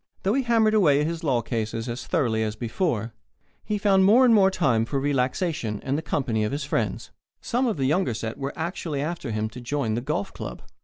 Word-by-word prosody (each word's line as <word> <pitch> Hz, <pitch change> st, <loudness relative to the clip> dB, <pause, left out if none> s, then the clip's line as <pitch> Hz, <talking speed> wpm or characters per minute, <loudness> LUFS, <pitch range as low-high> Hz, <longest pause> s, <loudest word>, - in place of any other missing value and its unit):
Though 195 Hz, -, +2 dB
he 270 Hz, -, +2 dB
hammered 225 Hz, -3 st, +3 dB
away 155 Hz, -10 st, +4 dB
at 150 Hz, -, +1 dB
his 165 Hz, +1 st, -3 dB
law 125 Hz, -6 st, +1 dB
cases 115 Hz, 0 st, -3 dB
as 120 Hz, +1 st, -5 dB
thoroughly 120 Hz, -10 st, +1 dB
as 110 Hz, -1 st, -2 dB
ever, 120 Hz, -, -1 dB, 0.5 s
he 210 Hz, -, -1 dB
found 195 Hz, -2 st, +4 dB
more 215 Hz, -1 st, +6 dB
time 130 Hz, -12 st, +2 dB
for 135 Hz, +4 st, -2 dB
relaxation 135 Hz, -, -1 dB
and 135 Hz, -, -1 dB
the 155 Hz, -, -1 dB
company 125 Hz, -8 st, -1 dB
of 105 Hz, -, -1 dB
his 145 Hz, +1 st, -2 dB
friends. 140 Hz, -, -2 dB, 0.3 s
Some 250 Hz, +2 st, 0 dB
of 220 Hz, -, -1 dB
the 135 Hz, -, 0 dB
younger 145 Hz, -4 st, +1 dB
set 110 Hz, 0 st, -5 dB
were 140 Hz, 0 st, -3 dB
actually 160 Hz, -3 st, -3 dB
after 170 Hz, -4 st, -4 dB
him 110 Hz, 0 st, -1 dB
to 125 Hz, +3 st, -10 dB
join 120 Hz, -3 st, -1 dB
the 115 Hz, -, -1 dB
golf 130 Hz, -7 st, -3 dB
club. -, -, -7 dB
140 Hz, 210 wpm, -25 LUFS, 115-185 Hz, 0.5 s, more